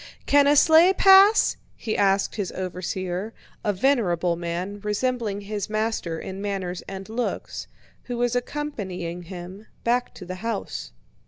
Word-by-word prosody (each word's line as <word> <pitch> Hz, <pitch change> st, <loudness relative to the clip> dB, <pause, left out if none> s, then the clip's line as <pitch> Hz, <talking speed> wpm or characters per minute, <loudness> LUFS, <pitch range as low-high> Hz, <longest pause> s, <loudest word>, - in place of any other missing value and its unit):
"Can 285 Hz, 0 st, +5 dB
a 290 Hz, -, +5 dB
sleigh 325 Hz, +5 st, +7 dB
pass?" 390 Hz, +3 st, +6 dB, 0.2 s
he 220 Hz, -, -3 dB
asked 195 Hz, 0 st, +2 dB
his 200 Hz, -4 st, -3 dB
overseer, 185 Hz, +2 st, -4 dB, 0.3 s
a 210 Hz, -, +2 dB
venerable 185 Hz, -, +1 dB
man, 175 Hz, +4 st, -4 dB
resembling 210 Hz, 0 st, -1 dB
his 205 Hz, 0 st, -4 dB
master 215 Hz, -6 st, -1 dB
in 190 Hz, +1 st, -6 dB
manners 190 Hz, -3 st, -3 dB
and 195 Hz, 0 st, -7 dB
looks, 230 Hz, +3 st, -4 dB, 0.4 s
who 245 Hz, -1 st, -4 dB
was 245 Hz, 0 st, +1 dB
accompanying 205 Hz, -, -4 dB
him 180 Hz, +3 st, -9 dB, 0.2 s
back 245 Hz, +1 st, +1 dB
to 185 Hz, -, -9 dB
the 185 Hz, +1 st, -6 dB
house. 215 Hz, -, -4 dB
205 Hz, 140 wpm, -24 LUFS, 185-245 Hz, 0.4 s, sleigh